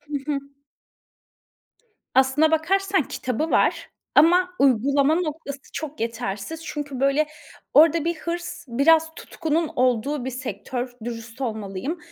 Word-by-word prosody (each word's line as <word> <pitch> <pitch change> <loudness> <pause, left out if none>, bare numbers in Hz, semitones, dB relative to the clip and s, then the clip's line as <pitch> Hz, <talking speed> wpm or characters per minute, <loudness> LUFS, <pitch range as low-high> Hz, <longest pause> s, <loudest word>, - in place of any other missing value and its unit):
Hı 295 0 -5 0.2
hı. 280 - -1 1.7
Aslına 265 +4 +4
bakarsan 380 +3 +2
kitabı 265 +4 -3
var - - +2 0.3
ama 355 +4 +5
uygulama 275 +3 +3
noktası 310 -4 -3
çok 305 -4 -6
yetersiz. 230 +6 -4
Çünkü, 290 -5 -5
böyle, 275 +3 +3 0.5
orada 320 +1 +6
bir 340 +1 0
hırs 340 +2 -5
biraz 320 +6 +3
tutkunun 325 0 -2
olduğu 250 +2 +1
bir 260 - -3
sektör, 250 0 -5
dürüst 230 +1 -7
olmalıyım. 220 - -3
285 Hz, 115 wpm, -24 LUFS, 250-320 Hz, 1.7 s, orada